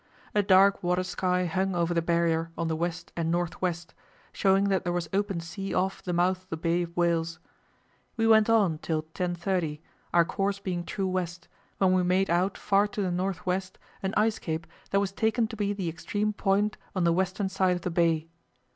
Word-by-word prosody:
A 210 - +4
dark 195 0 +5
water 180 +1 +1
sky 180 0 0
hung 190 +2 0
over 170 0 +1
the 170 - +2
Barrier 165 -1 +1
on 170 - -1
the 160 - 0
west 170 +1 -3
and 165 -1 -1
north 175 0 -1
west, 175 -2 -2 0.4
showing 195 0 +3
that 190 -2 +1
there 175 - -1
was 175 -2 -2
open 195 -2 0
sea 195 +4 -5
off 190 +1 0
the 180 - -4
mouth 180 +1 +1
of 185 - -30
the 160 - -3
Bay 170 +2 +1
of 170 0 -6
Whales. 165 -1 +1 0.8
We 225 - +2
went 220 -1 +5
on 200 -9 +3
till 155 -1 -2
10.30, 175 -1 -2 0.3
our 170 -1 +5
course 200 +2 -1
being 180 -3 -3
true 195 +1 -2
west, 180 -2 -3 0.3
when 185 -1 +3
we 185 - +3
made 185 +1 +2
out 180 +3 +1
far 200 0 +2
to 205 0 -4
the 185 - -1
north 185 +1 -2
west 185 +1 -2 0.2
an 190 0 -2
ice 215 +1 +2
cape 160 0 -3 0.2
that 195 - +2
was 200 -1 -1
taken 220 +3 +1
to 225 - -6
be 205 -1 -1
the 200 -3 -3
extreme 205 +6 -2
point 205 +1 +1 0.2
on 185 - +1
the 170 -1 +4
western 190 +2 0
side 185 -1 +2
of 175 - -5
the 180 - -2
bay. 165 -2 +2
180 Hz, 210 wpm, -28 LUFS, 170-195 Hz, 0.8 s, dark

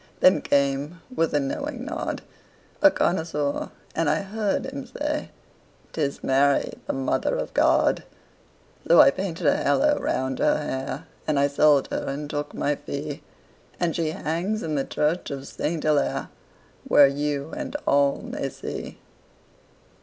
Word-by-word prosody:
Then 185 -5 +5
came, 140 +4 0 0.2
with 165 -1 +1
a - - +4
knowing 255 - -3
nod, 320 +2 -4 0.6
A 295 - +9
connoisseur, 160 - -1 0.2
and 165 -2 +1
I 155 +4 +2
heard 210 +3 -1
him 270 0 -6
say; 295 +4 -3 0.6
"'Tis 145 -3 -2
Mary, 140 +1 +2
the - - -1
Mother 135 -1 0
of - - -4
God." - - +3 0.9
So - - +7
I 135 - +9
painted 180 0 -4
a 145 - +4
halo 290 - +2
round 130 0 -1
her - - +3
hair, 135 -3 -4 0.2
And 155 -2 +1
I 140 - +4
sold 145 0 +4
her - - -2
and 145 +2 -3
took 145 0 -4
my 145 0 0
fee, 145 0 -5 0.6
And 175 -2 0
she 165 -2 0
hangs 170 +8 -2
in 155 - -2
the 140 -2 0
church 155 +4 -1
of 140 -2 -5
Saint 160 0 -3
Hillaire, 150 -2 +1 0.5
Where 145 - +7
you 145 +1 -1
and 295 -2 -5
all 140 0 +3
may - - -4
see. - - -7
150 Hz, 150 wpm, -25 LUFS, 140-185 Hz, 0.9 s, A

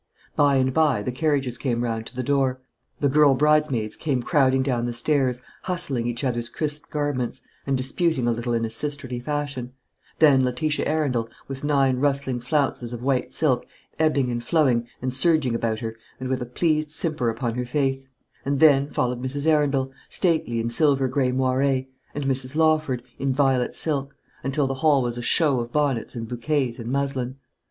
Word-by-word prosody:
By 145 -1 +4
and 130 -1 +2
by 145 -9 +2
the 125 - -2
carriages 135 -3 0
came 120 -3 -1
round 115 -1 -3
to - - -12
the 130 - -2
door. 135 -1 +1 0.4
The 145 - +4
girl 145 0 +5
bridesmaids 145 -7 +2
came 135 -6 -1
crowding 135 -4 +3
down 125 -3 0
the 120 - -3
stairs, 125 0 0 0.2
hustling 135 -10 0
each 120 +3 -3
other's 120 -2 -1
crisped 150 +2 -3
garments, 140 -4 -2 0.2
and 135 -1 +1
disputing 135 +1 0
a - - +3
little 120 +1 -2
in 115 0 0
a 110 - -5
sisterly 130 0 -3
fashion; 140 -2 -4 0.4
then 140 -4 +5
Letitia 130 +4 -1
Arundel, 140 -7 0 0.2
with 135 0 -7
nine 135 -3 +2
rustling 140 -2 0
flounces 125 -2 -1
of 120 0 -6
white 130 -1 0
silk 140 -6 +1 0.3
ebbing 145 -5 +2
and 120 0 -3
flowing 125 -5 +2 0.2
and 130 -1 -1
surging 155 -4 +3
about 115 -1 -1
her, 115 -1 -4 0.2
and 130 0 -4
with 130 -1 -1
a 125 - -4
pleased 155 +3 0
simper 155 -5 -1
upon 115 +1 -2
her 125 +1 -3
face; 135 0 -1 0.4
and 140 0 -1
then 145 -2 +5
followed 125 -2 -1
Mrs. 140 +3 -3
Arundel, 145 -4 +2 0.2
stately 160 -10 0
in 115 +1 -2
silver 135 0 +3
grey 130 0 +1
moire, 130 0 +1 0.5
and 145 - -2
Mrs. 130 0 -1
Lawford, 155 -6 +2 0.2
in 135 0 0
violet 135 -2 +1
silk 140 -3 0 0.3
until 135 +2 0
the 135 - -1
hall 145 -4 +4
was 120 0 -3
a - - -4
show 140 +1 +3
of 120 0 -4
bonnets 140 -6 0
and 115 -1 -5
bouquets 125 +1 -1
and 115 +1 -5
muslin. 135 -2 -1
135 Hz, 180 wpm, -24 LUFS, 125-145 Hz, 0.5 s, girl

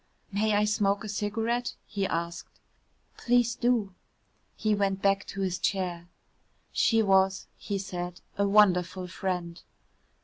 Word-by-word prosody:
"May 210 +1 +1
I 210 +1 +3
smoke 205 -1 +1
a - - -5
cigarette?" 225 +4 -1
he 200 -2 -2
asked. 170 0 -4 0.6
"Please 240 -1 +2
do." 230 -5 +1 0.6
He 215 -1 +1
went 195 -1 0
back 195 0 +1
to 195 - -5
his 185 -1 -1
chair. 175 -1 -2 0.6
She 225 -1 +3
was, 190 -1 +3
he 200 - -4
said, 180 -2 -5 0.2
a 200 0 +1
wonderful 185 -3 +3
friend. 180 -2 -4
195 Hz, 130 wpm, -28 LUFS, 185-210 Hz, 0.6 s, I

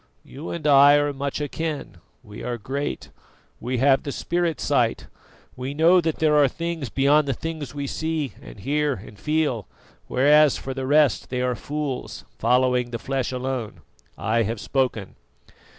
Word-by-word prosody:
You 145 +5 -8
and 170 -3 -5
I 145 0 +7
are 145 0 +1
much 140 +1 -3
akin 150 - -4 0.3
we 105 -3 -10
are 120 0 -3
great; 140 +6 -4 0.5
we 125 +2 -2
have 135 +2 +4
the 140 - -5
spirit 170 -1 -1
sight; - - +1 0.5
we 130 +3 -5
know 170 +4 +5
that 160 -2 -1
there 155 -1 +3
are 145 -2 +6
things 165 -2 -4
beyond 140 +4 +3
the 135 - 0
things 155 -4 -6
we 140 -1 -3
see 160 -1 -2
and - - -12
hear 145 +5 0
and 105 -1 -11
feel; 150 - 0 0.4
whereas, 150 +2 +4
for 135 - -5
the 130 0 -4
rest, 150 0 +3
they 125 0 -1
are 125 0 +1
fools, 145 +2 -5
following 125 -1 +2
the 120 - -4
flesh 135 +1 -2
alone. 130 -3 -4 0.4
I 110 +7 +1
have 115 0 -2
spoken." 125 -8 -2
140 Hz, 165 wpm, -24 LUFS, 125-150 Hz, 0.5 s, I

